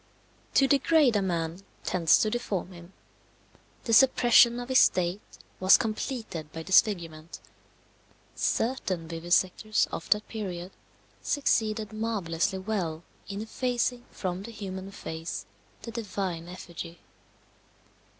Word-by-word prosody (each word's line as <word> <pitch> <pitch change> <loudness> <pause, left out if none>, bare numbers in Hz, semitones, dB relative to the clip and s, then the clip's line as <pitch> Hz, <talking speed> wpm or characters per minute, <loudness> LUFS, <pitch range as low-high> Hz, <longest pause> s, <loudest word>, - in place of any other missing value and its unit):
To 270 - +5
degrade 275 -5 +4
man 170 -2 -2 0.2
tends 165 -4 +4
to 215 - +1
deform 200 -6 -3
him. 170 0 -13 0.9
The 230 - -1
suppression 240 -1 +6
of 245 +1 -7
his 260 - +5
state 180 +2 +2 0.4
was 185 +1 +7
completed 215 - -4
by 160 0 -6
disfigurement. 170 -4 +1 0.9
Certain 190 -9 -1
vivisectors 175 +5 +1
of 165 - -6
that 210 0 +2
period 185 -4 -5 0.5
succeeded 220 -6 0
marvellously 200 -4 -1
well 185 -5 -3 0.2
in 200 +2 -4
effacing 245 +1 -1
from 185 -1 -4
the 225 +4 -8
human 190 -3 -6
face 165 -4 -6 0.4
the 230 - -6
divine 190 -6 -4
effigy. 170 -1 -8
195 Hz, 110 wpm, -28 LUFS, 175-225 Hz, 0.9 s, was